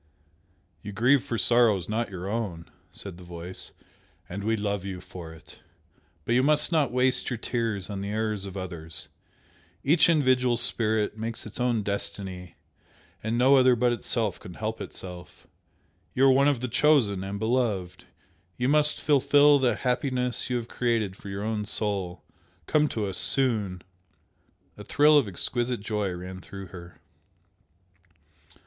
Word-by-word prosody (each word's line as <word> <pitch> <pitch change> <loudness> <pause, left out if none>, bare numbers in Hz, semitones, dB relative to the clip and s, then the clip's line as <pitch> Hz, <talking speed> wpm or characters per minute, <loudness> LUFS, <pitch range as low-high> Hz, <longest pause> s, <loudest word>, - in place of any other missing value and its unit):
"You 105 - -7
grieve 125 +6 +4
for 120 - -3
sorrows 110 -7 +3
not 115 +2 -1
your 95 -1 -6
own," 100 -6 -4 0.2
said 95 -4 -5
the - - -11
Voice 85 +1 -6 0.6
"And 100 +3 -6
we 110 +2 +1
love 100 -2 -2
you 95 -2 -5
for 90 -2 -10
it. 80 - -15 0.7
But 115 - +1
you 125 - +4
must 150 +4 +2
not 155 -6 +2
waste 125 +1 +1
your 125 - -2
tears 115 -5 -2
on 100 -2 -5
the 100 - -4
errors 105 -2 -1
of 95 0 -7
others. 80 -4 -5 0.7
Each 155 +5 +5
individual 130 -6 +3
Spirit 110 -2 0
makes 115 +1 -5
its 110 - -8
own 120 -3 +1
destiny, 95 -3 -4 0.7
and 110 +2 -1
no 130 +3 +6
other 130 -1 +5
but 120 +1 +2
Itself 115 -4 -2
can 90 - -10
help 110 +3 -4
Itself. 90 -2 -9 0.7
You 135 - +4
are 135 - +7
one 135 +2 +4
of 140 -5 +1
the 125 - -1
Chosen 120 -7 +3
and 100 +1 -4
Beloved! 105 -6 -1 0.5
You 125 +1 0
must 150 +1 +3
fulfil 145 0 +5
the 125 -4 +2
happiness 125 -1 -1
you 125 - 0
have 120 -1 -3
created 115 -7 -1
for 100 - -10
your 100 +1 -4
own 110 -1 -1
soul! 100 -4 -3 0.4
Come 150 0 +3
to 110 -6 -2
us 95 -2 -2
soon!" 105 -9 +1 1.0
A - - -7
thrill 150 +1 +4
of 130 - -1
exquisite 120 +5 -2
joy 105 -2 -2
ran 90 +1 -7
through 95 0 -9
her. 85 -1 -11
110 Hz, 155 wpm, -27 LUFS, 95-125 Hz, 1.0 s, are